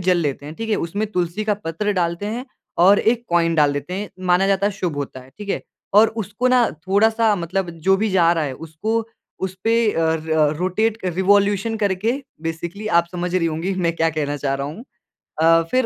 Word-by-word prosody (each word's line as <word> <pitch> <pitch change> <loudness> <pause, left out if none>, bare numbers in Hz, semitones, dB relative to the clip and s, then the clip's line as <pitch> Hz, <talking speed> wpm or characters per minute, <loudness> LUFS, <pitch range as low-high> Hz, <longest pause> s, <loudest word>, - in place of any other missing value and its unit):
जल 180 0 +3
लेते 145 -3 -2
हैं, 150 - -7
ठीक 225 +4 -5
है? 210 - +3
उसमें 200 +6 -2
तुलसी 180 +4 -1
का 210 -1 +1
पत्र 205 +2 -2
डालते 175 +1 -1
हैं 235 +4 -4 0.4
और 200 +2 +7
1 235 +1 +1
कॉइन 170 -1 +2
डाल 150 -3 +4
देते 145 +5 -4
हैं, 200 +2 -4 0.2
माना 180 +2 +4
जाता 195 0 +2
है 205 - 0
शुभ 180 -6 -3
होता 140 -2 -5
है, 130 +1 -16
ठीक 205 -1 -8
है? - - -1 0.3
और 215 +2 +7
उसको 210 +6 -1
ना 250 -1 +5 0.2
थोड़ा-सा 220 +3 +3
मतलब 185 +1 -2 0.2
जो 195 - +6
भी 215 +3 0
जा 170 -3 +4
रहा 165 -2 0
है 140 - -3 0.2
उसको 220 +9 -1 0.4
उसपे 190 +4 -1 0.2
अ, - - -1 0.2
र 155 -2 +2
रोटेट 205 +5 0
कर 185 -5 -3
रिवोल्यूशन 200 +3 +2
करके, 205 +2 0 0.3
बेसिकली 170 +5 -5
आप 170 - +2
समझ 180 0 -3
रही 175 -2 +2
होंगी 165 +4 -2
मैं 165 - +2
क्या 165 0 +2
कहना 145 -2 -2
चाह 140 -1 -1
रहा 140 0 -3
हूँ। 160 - -8 0.6
अ, 165 +1 +6
फिर 255 -1 +2
185 Hz, 210 wpm, -21 LUFS, 165-210 Hz, 0.6 s, और